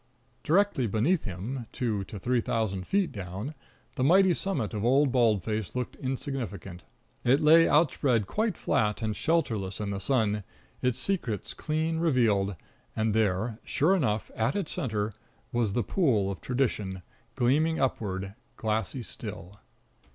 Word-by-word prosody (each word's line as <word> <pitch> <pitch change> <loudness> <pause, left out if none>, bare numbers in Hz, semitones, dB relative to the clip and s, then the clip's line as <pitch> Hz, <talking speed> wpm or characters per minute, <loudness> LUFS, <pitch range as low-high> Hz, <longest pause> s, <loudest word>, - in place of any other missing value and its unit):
Directly 175 - +2
beneath 120 - +1
him, 110 +6 -5
two 110 -5 -1
to 105 - -8
three 120 +4 +1
thousand 100 -5 -2
feet 195 -3 +1
down, 100 - -5 0.4
the 130 - -1
mighty 185 +5 +5
summit 155 - -2
of 105 -1 -2
Old 135 +3 +4
Bald 115 -7 +3
Face 110 -1 -3
looked 125 -1 -3
insignificant. 125 - -4 0.4
It 130 +3 +4
lay 160 +2 +6
outspread 135 -7 +3
quite 215 - -1
flat 105 +1 0
and 110 -1 0
shelterless 110 - 0
in 105 -1 -2
the 100 - -3
sun, 105 -2 +1 0.4
its 125 -1 +1
secrets 130 - -2
clean 160 +1 -1
revealed, 110 - +2 0.4
and 110 -1 +1
there, 110 +1 0
sure 170 +7 +2
enough, 110 - 0
at 115 +4 0
its 195 -6 -2
center, 110 - -2 0.4
was 115 -4 0
the 120 - +1
pool 110 - +2
of 95 - -7
tradition, 105 -8 -1 0.3
gleaming 150 +6 +2
upward, 100 -7 -1 0.2
glassy 110 +3 -1
still. 95 -2 -6
115 Hz, 145 wpm, -28 LUFS, 105-145 Hz, 0.4 s, lay